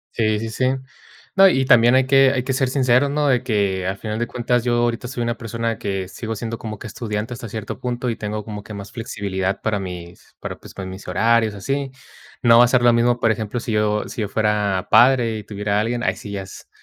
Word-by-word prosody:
Sí, 110 -2 +1
sí, 115 +1 -4
sí. 130 - -1 0.7
No, 195 0 +8
y 135 -5 +1
también 120 0 +6
hay 130 0 +4
que 135 0 +5
hay, 125 - -1
que 130 - -2
ser 130 0 +1
sincero, 130 0 +3
¿no? 145 0 +1
De 125 -2 +3
que 100 -5 0
al 95 +1 -2
final 110 +1 -4
de 120 - -1
cuentas, 120 -1 0
yo 120 -1 +1
ahorita 120 0 0
soy 120 -1 -3
una 120 0 -2
persona 115 -1 -3
que 95 -2 -3
sigo 110 +3 -5
siendo 115 +1 -5
como 110 -2 -6
que - - -10
estudiante 110 +1 -4
hasta 115 -2 -8
cierto 110 -1 -6
punto 125 0 -2
y - - -3
tengo 105 0 -4
como 105 -2 -6
que 105 0 -9
más 100 0 -8
flexibilidad 100 -4 -3
para 105 -2 0
mis 90 -2 -9
para - - -6
pues, - - -13
mis 95 0 -9
horarios 110 +3 +2
así. 135 +7 -2 0.5
No 115 0 +7
va 120 - +8
a - - +1
ser 125 0 +2
lo 120 -1 +6
mismo, 120 +1 +2
por 115 - +3
ejemplo, 110 +2 -3
si 115 - -5
yo 105 0 +1
si 110 +3 -5
yo 105 - -2
fuera 105 -3 0
padre 120 -3 +5
y 105 - -9
tuviera 105 0 -2
a 105 - +3
alguien, 120 +2 -2
ahí - - +1
sí 105 - -10
ya 100 -1 -4
es, 95 - -12
115 Hz, 240 wpm, -21 LUFS, 105-120 Hz, 0.7 s, No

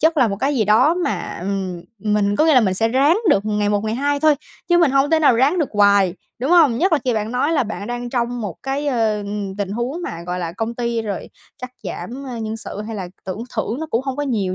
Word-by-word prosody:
chất 320 +2 +3
là 255 -6 +4
một 200 - -2
cái 275 +7 0
gì 220 - +2
đó 245 - +4
mà, 280 - -3
ừm, 185 -2 -3 0.2
mình 205 0 +1
có 310 - +4
nghĩa 315 - +5
là 255 - +7
mình 190 -4 +1
sẽ 225 +4 +1
ráng 280 - +3
được 200 - +3
ngày 210 -1 0
một 205 -1 +1
ngày 220 +1 -1
hai 285 +2 0
thôi 310 -1 +5 0.3
chứ 345 - +4
mình 335 -5 +4
hông 275 +2 +2
thể 320 - +4
nào 285 -6 +5
ráng 285 +8 +3
được 305 - +1
hoài, 200 -3 +4 0.2
đúng 260 +6 -1
hông? 310 -10 +5
Nhất 360 +2 +2
là 310 - +5
khi 250 -2 +1
bạn 215 +2 -2
nói 280 +6 +1
là 300 - +3
bạn 205 -2 -5
đang 240 0 -4
trong 245 -1 -1
một 210 - -5
cái, 275 +2 -2
ơ, 225 -5 +1
ừm, 205 -1 -5
tình 200 -2 -2
huống 245 +10 -3
mà, 170 - -5
gọi 180 0 -3
là, 170 -2 -3
công 225 +5 -3
ty 235 -1 -1
rồi 205 -4 -5 0.3
cắt 255 - -5
giảm, 235 +9 -6
a, 245 -3 -5
nhân 220 0 -4
sự 210 -1 -7
hay 225 -1 -5
là 185 -3 -5 0.2
tưởng 190 +4 -5
thưởng 230 +5 -2
nó 320 - -3
cũng 230 - +1
hông 265 -2 -3
có 290 - -1
nhiều 210 -9 -1
230 Hz, 270 wpm, -20 LUFS, 205-280 Hz, 0.3 s, là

